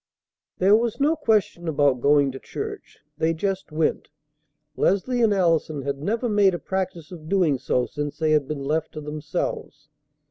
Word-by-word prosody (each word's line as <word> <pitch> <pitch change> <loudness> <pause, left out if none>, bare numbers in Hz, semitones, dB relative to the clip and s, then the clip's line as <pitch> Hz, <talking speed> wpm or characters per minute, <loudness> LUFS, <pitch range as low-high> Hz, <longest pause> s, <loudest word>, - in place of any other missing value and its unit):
There 195 +3 +5
was 230 +2 0
no 300 +4 +3
question 210 - 0
about 145 -5 +2
going 140 0 +4
to 135 - -8
church. - - -7 0.2
They 165 +1 +1
just 190 +1 -3
went. 155 +1 -1 0.7
Leslie 240 +6 +1
and 225 -2 +4
Allison 165 -6 +1
had 140 0 -3
never 225 +8 -1
made 205 -4 +3
a - - -2
practice 180 -4 -4
of 160 -3 -10
doing 175 -9 +2
so 125 -1 0
since 145 0 -5
they 155 -1 +1
had 150 -3 +2
been 145 -2 -4
left 155 +3 -1
to 155 - -6
themselves. 150 0 -5
160 Hz, 170 wpm, -24 LUFS, 145-195 Hz, 0.7 s, There